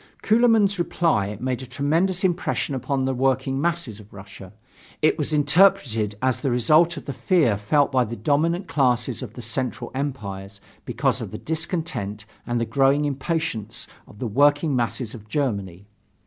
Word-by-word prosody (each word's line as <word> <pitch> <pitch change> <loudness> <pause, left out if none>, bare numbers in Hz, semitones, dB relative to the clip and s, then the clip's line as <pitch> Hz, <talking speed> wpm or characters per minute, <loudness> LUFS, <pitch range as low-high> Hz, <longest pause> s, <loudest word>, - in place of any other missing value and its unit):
Kuehlmann's 220 -3 +3
reply 130 - 0
made 130 0 -2
a 130 - -8
tremendous 165 +9 0
impression 180 -5 0
upon 135 0 -1
the 135 - 0
working 135 +1 0
masses 165 -10 -2
of 105 0 -15
Russia. 95 -1 -12 0.5
It 155 - +4
was 155 -1 -3
interpreted 145 - +3
as 130 +1 0
a 135 - +1
result 155 +8 +3
of - - -8
the 140 - -4
fear 150 - +2
felt 140 +8 +1
by 130 -2 +2
the 115 - -6
dominant 160 - 0
classes 125 -4 +1
of 120 -5 -7
the 120 - -8
Central 130 0 -4
Empires 100 -8 -5 0.3
because - - 0
of - - -5
the - - -7
discontent 160 - -3 0.2
and 120 0 0
the 115 - 0
growing 140 +3 +2
impatience 140 - -3 0.2
of - - -16
the 125 - -4
working 145 +5 +3
masses 115 -1 -1
of 105 -3 -11
Germany. 100 - -3
135 Hz, 160 wpm, -23 LUFS, 115-160 Hz, 0.5 s, It